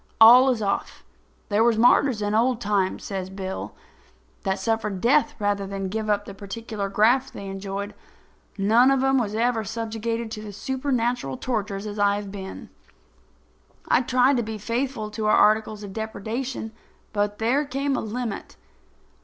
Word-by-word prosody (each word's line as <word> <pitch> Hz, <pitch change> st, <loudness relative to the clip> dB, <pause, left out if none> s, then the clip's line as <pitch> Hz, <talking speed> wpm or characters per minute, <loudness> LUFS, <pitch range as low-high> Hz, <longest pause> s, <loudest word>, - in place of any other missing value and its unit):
All 245 Hz, +4 st, +9 dB
is 235 Hz, -4 st, 0 dB
off. 200 Hz, 0 st, -2 dB, 0.5 s
There 210 Hz, +1 st, +3 dB
was 235 Hz, -1 st, +3 dB
martyrs 240 Hz, -1 st, +4 dB
in 205 Hz, 0 st, -1 dB
old 235 Hz, +2 st, +2 dB
times," 200 Hz, -4 st, -1 dB
goes 190 Hz, -2 st, -4 dB
on 190 Hz, -, -12 dB
Bill, 190 Hz, -1 st, -5 dB, 0.7 s
"that 190 Hz, -1 st, -1 dB
suffered 210 Hz, -1 st, -1 dB
death 290 Hz, +7 st, +3 dB
rather 205 Hz, -1 st, -1 dB
than 195 Hz, -1 st, -4 dB
give 215 Hz, +2 st, -3 dB
up 205 Hz, 0 st, +1 dB
the 200 Hz, -, -8 dB
particular 200 Hz, +1 st, -5 dB
graft 235 Hz, +6 st, +3 dB
they 200 Hz, -, -8 dB
enjoyed. 195 Hz, +1 st, -5 dB, 0.6 s
None 225 Hz, +6 st, +5 dB
of 270 Hz, -1 st, +2 dB
'em 270 Hz, -1 st, +3 dB
ever 225 Hz, +2 st, 0 dB
was 210 Hz, -3 st, -5 dB
subjugated 230 Hz, 0 st, -3 dB
to 215 Hz, -, -5 dB
such -, -, -12 dB
supernatural 245 Hz, -, -1 dB
tortures 210 Hz, -4 st, -3 dB
as 210 Hz, 0 st, -5 dB
I 200 Hz, 0 st, +3 dB
have 205 Hz, -1 st, -5 dB
been. 190 Hz, -1 st, -8 dB, 1.2 s
I -, -, +4 dB
tried 255 Hz, +2 st, +3 dB
to -, -, +2 dB
be 220 Hz, 0 st, -5 dB
faithful 230 Hz, 0 st, -3 dB
to 215 Hz, 0 st, -2 dB
our 215 Hz, -, +5 dB
articles 215 Hz, 0 st, +3 dB
of 200 Hz, -1 st, -8 dB
depredation; 225 Hz, +3 st, -4 dB, 0.4 s
but 205 Hz, 0 st, 0 dB
there 245 Hz, +6 st, +1 dB
came 275 Hz, 0 st, -1 dB
a -, -, -1 dB
limit." 225 Hz, -1 st, -5 dB
220 Hz, 165 wpm, -24 LUFS, 200-240 Hz, 1.2 s, All